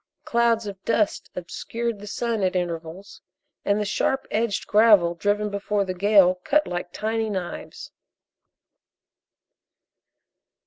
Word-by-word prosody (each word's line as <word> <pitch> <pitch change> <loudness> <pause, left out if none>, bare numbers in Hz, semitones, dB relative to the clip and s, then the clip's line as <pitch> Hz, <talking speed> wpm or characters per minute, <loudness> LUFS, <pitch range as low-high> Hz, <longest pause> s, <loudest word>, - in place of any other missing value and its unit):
Clouds 235 -1 +2
of 195 -2 -8
dust 215 -3 0
obscured 225 +5 -4
the 205 - -10
sun 230 0 -2
at 185 -1 0
intervals, 175 +2 -5 0.4
and 200 +1 +1
the 210 - -1
sharp 265 +6 0
edged 220 -1 -1
gravel 210 -5 +5
driven 205 +4 -1
before 200 0 -1
the 185 - -3
gale 185 -1 +4
cut 300 +1 +2
like 175 0 -5
tiny 220 +2 -2
knives. 185 -4 -6
205 Hz, 120 wpm, -24 LUFS, 185-225 Hz, 0.4 s, gravel